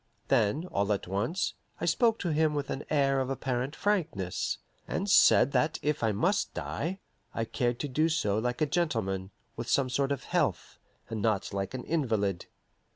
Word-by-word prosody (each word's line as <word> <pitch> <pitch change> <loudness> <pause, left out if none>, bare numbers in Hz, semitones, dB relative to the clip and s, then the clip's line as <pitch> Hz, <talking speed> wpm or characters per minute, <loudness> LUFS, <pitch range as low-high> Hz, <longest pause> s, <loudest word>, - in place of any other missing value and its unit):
Then, 110 - +2
all 100 +1 +1
at 100 - -4
once, 110 - -1 0.3
I - - -2
spoke 225 +7 +3
to 170 -4 0
him 155 0 +2
with 145 -1 -2
an 135 - -4
air 135 -2 +3
of 130 0 -1
apparent 130 +1 -2
frankness, 160 - -1 0.3
and 195 - -2
said 190 - +6
that 155 +2 +1
if 150 0 0
I 110 -2 +2
must 175 - 0
die, 180 +6 -3 0.4
I 115 - 0
cared 120 +1 -1
to 145 - -2
do 155 +5 +2
so 105 -10 +1
like 125 +5 -2
a - - +5
gentleman, 115 - -1 0.3
with 115 +1 -5
some 130 -2 +2
sort 135 +2 +1
of 140 - -2
health, - - -1 0.3
and 110 -2 -2
not 110 -3 0
like 100 +4 -3
an 125 - -5
invalid. 110 - 0
135 Hz, 180 wpm, -29 LUFS, 110-155 Hz, 0.4 s, said